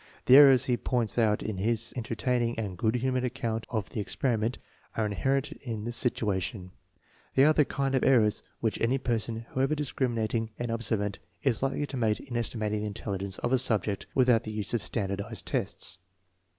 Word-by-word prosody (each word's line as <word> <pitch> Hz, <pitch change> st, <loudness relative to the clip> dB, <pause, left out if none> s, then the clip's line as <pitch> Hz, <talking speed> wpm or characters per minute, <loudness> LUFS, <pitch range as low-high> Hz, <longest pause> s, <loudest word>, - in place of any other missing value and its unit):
The 130 Hz, -, +8 dB
errors 135 Hz, -3 st, +8 dB
he 125 Hz, -2 st, +1 dB
points 120 Hz, -2 st, 0 dB
out 105 Hz, -2 st, +2 dB
in 105 Hz, -3 st, -3 dB
his 115 Hz, +3 st, 0 dB
entertaining 120 Hz, 0 st, -1 dB
and 105 Hz, -5 st, -3 dB
good 110 Hz, +6 st, 0 dB
humored 130 Hz, +1 st, 0 dB
account 115 Hz, -2 st, -2 dB
of 110 Hz, -4 st, -3 dB
the 105 Hz, -, -2 dB
experi 120 Hz, +1 st, 0 dB
ment 115 Hz, +4 st, -1 dB, 0.4 s
are 110 Hz, -, +1 dB
inherent 135 Hz, +7 st, 0 dB
in 115 Hz, -8 st, -6 dB
the 120 Hz, -, -3 dB
situation. 100 Hz, -5 st, -1 dB, 0.6 s
They 135 Hz, -, +6 dB
are 155 Hz, -, +6 dB
the 150 Hz, -2 st, +4 dB
kind 135 Hz, 0 st, -1 dB
of 130 Hz, -, +2 dB
errors 115 Hz, -6 st, +4 dB, 0.2 s
which 110 Hz, -2 st, -1 dB
any 120 Hz, +4 st, +2 dB
person, 115 Hz, -2 st, -2 dB
however 135 Hz, +3 st, +1 dB
discriminating 115 Hz, -6 st, -1 dB
and 120 Hz, -1 st, -3 dB
ob 115 Hz, 0 st, -2 dB
servant, 105 Hz, -2 st, -1 dB, 0.2 s
is 130 Hz, -5 st, +1 dB
likely 135 Hz, +2 st, 0 dB
to 140 Hz, -, -6 dB
make 110 Hz, -3 st, +1 dB
in 130 Hz, -4 st, -8 dB
estimating 110 Hz, -2 st, -1 dB
the 105 Hz, -, -2 dB
intelligence 100 Hz, -2 st, -4 dB
of 120 Hz, -, -1 dB
a 130 Hz, -, +4 dB
subject 110 Hz, -5 st, 0 dB
without 125 Hz, -4 st, +4 dB
the 110 Hz, -, -6 dB
use 105 Hz, 0 st, -2 dB
of 120 Hz, -, +1 dB
standardized 100 Hz, +1 st, -3 dB
tests. 100 Hz, -6 st, -2 dB
115 Hz, 190 wpm, -29 LUFS, 105-130 Hz, 0.6 s, The